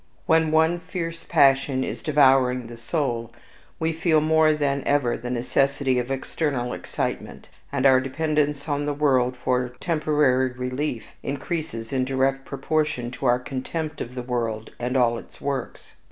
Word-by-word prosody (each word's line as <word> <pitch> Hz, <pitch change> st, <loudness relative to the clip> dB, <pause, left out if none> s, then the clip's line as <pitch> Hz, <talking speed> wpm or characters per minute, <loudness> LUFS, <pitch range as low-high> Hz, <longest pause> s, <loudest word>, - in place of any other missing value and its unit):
When 160 Hz, 0 st, +3 dB
one 160 Hz, +2 st, +3 dB
fierce 165 Hz, -1 st, -5 dB
passion 135 Hz, -1 st, +3 dB
is -, -, -4 dB
devouring 130 Hz, -4 st, +4 dB
the 120 Hz, +1 st, -9 dB
soul, 120 Hz, -2 st, -2 dB, 0.5 s
we 160 Hz, 0 st, 0 dB
feel 160 Hz, 0 st, +3 dB
more 155 Hz, 0 st, +4 dB
than 140 Hz, -2 st, 0 dB
ever 140 Hz, -4 st, +2 dB
the 120 Hz, +1 st, -6 dB
necessity 130 Hz, +2 st, +1 dB
of 125 Hz, +1 st, -3 dB
external 135 Hz, -2 st, -2 dB
excitement; -, -, -4 dB, 0.2 s
and 140 Hz, -1 st, -1 dB
our 130 Hz, -1 st, +6 dB
dependence 150 Hz, +1 st, -1 dB
on 145 Hz, -1 st, -1 dB
the 145 Hz, -, -1 dB
world 130 Hz, -4 st, +2 dB
for 125 Hz, 0 st, 0 dB
temporary 145 Hz, -6 st, +2 dB
relief 125 Hz, 0 st, -3 dB
increases 140 Hz, -5 st, -4 dB
in 130 Hz, -1 st, +1 dB
direct 135 Hz, +1 st, 0 dB
proportion 145 Hz, -3 st, -1 dB
to 125 Hz, +1 st, -3 dB
our 120 Hz, 0 st, +4 dB
contempt 140 Hz, +5 st, -5 dB
of 125 Hz, +2 st, -6 dB
the 125 Hz, -, -4 dB
world 115 Hz, -3 st, -3 dB
and 125 Hz, +2 st, -1 dB
all 120 Hz, -2 st, +3 dB
its -, -, -15 dB
works. 140 Hz, -1 st, -4 dB
135 Hz, 155 wpm, -24 LUFS, 125-150 Hz, 0.5 s, our